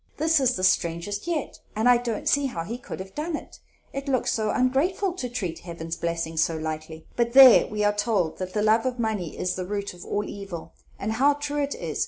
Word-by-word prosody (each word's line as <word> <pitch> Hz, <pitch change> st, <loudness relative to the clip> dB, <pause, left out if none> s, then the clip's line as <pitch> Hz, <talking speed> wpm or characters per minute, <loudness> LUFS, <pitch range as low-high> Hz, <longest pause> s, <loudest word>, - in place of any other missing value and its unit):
This 320 Hz, +1 st, +3 dB
is 260 Hz, -2 st, +2 dB
the 185 Hz, -, -4 dB
strangest 175 Hz, -, 0 dB
yet, 325 Hz, -5 st, -3 dB, 0.2 s
and 220 Hz, +3 st, +1 dB
I 245 Hz, -1 st, +7 dB
don't 235 Hz, -2 st, -3 dB
see 285 Hz, -1 st, +3 dB
how 170 Hz, -10 st, -4 dB
he 230 Hz, +8 st, -6 dB
could 235 Hz, -, -8 dB
have 190 Hz, 0 st, -8 dB
done 315 Hz, +2 st, -3 dB
it; -, -, -9 dB, 0.3 s
it 275 Hz, +1 st, -5 dB
looks 260 Hz, -3 st, +1 dB
so 215 Hz, -1 st, 0 dB
ongrateful 305 Hz, -, +1 dB
to 250 Hz, -, -3 dB
treat 185 Hz, -9 st, -4 dB
Heaven's 165 Hz, -1 st, -6 dB
blessings 165 Hz, -1 st, -1 dB
so 165 Hz, -1 st, -1 dB
lightly. 155 Hz, 0 st, -5 dB
But 235 Hz, 0 st, 0 dB
there, 260 Hz, -2 st, +9 dB
we 210 Hz, 0 st, -2 dB
are 205 Hz, 0 st, +3 dB
told 205 Hz, -6 st, 0 dB
that 185 Hz, 0 st, -5 dB
the 210 Hz, -, 0 dB
love 220 Hz, +3 st, +3 dB
of 250 Hz, -1 st, -2 dB
money 215 Hz, -8 st, -2 dB
is 180 Hz, 0 st, -1 dB
the 185 Hz, -, -4 dB
root 200 Hz, -1 st, -3 dB
of 175 Hz, -, -11 dB
all 205 Hz, -, -2 dB
evil, 195 Hz, -5 st, -7 dB, 0.2 s
and 215 Hz, -, -3 dB
how 275 Hz, +6 st, +3 dB
true 290 Hz, 0 st, -2 dB
it 285 Hz, 0 st, -2 dB
is! 160 Hz, -3 st, -5 dB
215 Hz, 230 wpm, -25 LUFS, 175-260 Hz, 0.3 s, there